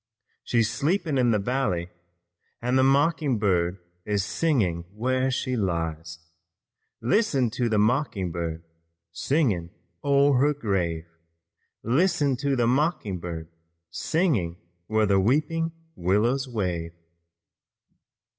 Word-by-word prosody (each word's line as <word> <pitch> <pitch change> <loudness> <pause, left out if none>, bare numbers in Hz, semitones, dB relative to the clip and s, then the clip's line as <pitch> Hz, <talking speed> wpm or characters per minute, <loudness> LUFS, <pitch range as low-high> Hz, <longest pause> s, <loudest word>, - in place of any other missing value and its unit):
She's 115 -3 +2
sleeping 155 - 0
in 125 -1 +3
the 110 - +3
valley 100 -6 -1 0.7
And 125 +2 -1
the 130 - +5
mocking 140 -1 +2
bird 90 -3 +1 0.3
is 100 -1 -1
singing 105 - 0
where 130 +3 0
she 130 0 -1
lies. 80 -5 -2 0.8
Listen 135 - +2
to 120 0 -1
the 110 - +1
mocking 105 - +1
bird, 80 -1 -4 0.5
singing 100 - 0 0.3
o'er 140 -1 +4
her 145 +2 +3
grave. 90 - -1 0.8
Listen 145 - +2
to 140 +1 0
the 120 -2 +2
mocking 125 - 0
bird, 80 -2 -6 0.4
singing 125 - 0 0.3
where 110 0 +2
the 100 -1 +3
weeping 155 +9 +1 0.2
willows 115 +9 +1
wave." 90 -8 -3
115 Hz, 110 wpm, -26 LUFS, 90-140 Hz, 0.8 s, the